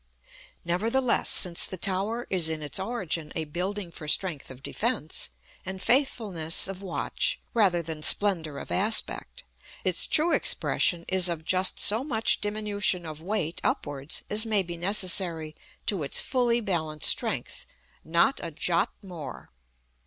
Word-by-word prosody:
Nevertheless, 230 +9 +1
since 175 -3 +3
the 185 - -2
tower 195 +7 -1
is 175 -4 +3
in 155 -1 -3
its 145 +5 -3
origin 185 -7 -3
a 160 - -2
building 180 +4 -4
for 155 -2 -10
strength 160 -2 0
of 130 0 -12
defence, 225 -9 -1 0.3
and 190 0 -6
faithfulness 205 - +1
of 195 0 -7
watch, 195 - -2
rather 190 -7 +2
than 160 -1 -6
splendor 165 -5 +4
of - - -8
aspect, 220 - 0 0.4
its - - +3
true 325 +3 +4
expression 170 -2 +2
is 185 -1 +1
of 160 -2 -5
just 185 +1 +3
so 220 +5 +3
much 225 -6 0
diminution 205 -3 0
of 155 -1 -7
weight 175 -3 -3
upwards 140 0 -2
as 210 +1 +2
may 215 -4 +1
be 175 -1 -6
necessary 175 -4 +1 0.3
to 200 -7 0
its 140 - +2
fully 240 -2 +1
balanced 160 -7 -1
strength, - - -1 0.4
not 170 +12 +2
a 170 - -3
jot 170 +5 +1
more. 175 - -9
185 Hz, 145 wpm, -27 LUFS, 160-210 Hz, 0.4 s, splendor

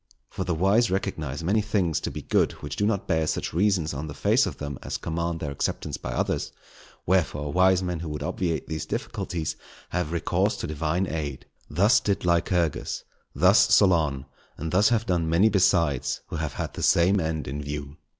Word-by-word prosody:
For - - -3
the 90 -2 -1
wise 100 +8 +3
recognize 80 -6 -3
many 100 +6 +2
things 100 -7 0
to - - -3
be - - -7
good - - +2
which 75 0 -7
do 100 - +1
not 100 -3 -1
bear 80 -1 +1
such - - -2
reasons 90 -3 +1
on 75 +3 -4
the 70 - -7
face - - +3
of - - -6
them 70 -3 -5
as - - -4
command 85 0 -3
their 75 -3 -4
acceptance 70 - -2
by - - -6
others; - - -1 0.5
wherefore, 75 -5 0
wise 95 0 +4
men 90 -2 -2
who 85 -1 -5
would 75 0 -4
obviate 85 -3 -2
these 80 -1 -4
difficulties, 80 -3 -3 0.3
have 90 -3 -2
recourse 85 - 0
to - - -4
Divine 80 +4 -1
aid. 75 -6 -4 0.2
Thus 100 +10 +4
did 100 -3 -1
Lycurgus, 85 -2 0 0.3
thus 90 +9 +5 0.2
Solon, 80 -9 +3 0.3
and 80 +1 -4
thus 100 +4 +4
have 115 -2 +1
done 85 -5 0
many 90 +7 +4
besides 85 - +2
who - - -4
have 80 -3 -3
had - - -4
the - - -6
same 95 +4 +4
end 80 -2 -2
in 70 +3 -4
view. 70 0 -6
85 Hz, 190 wpm, -26 LUFS, 75-95 Hz, 0.5 s, thus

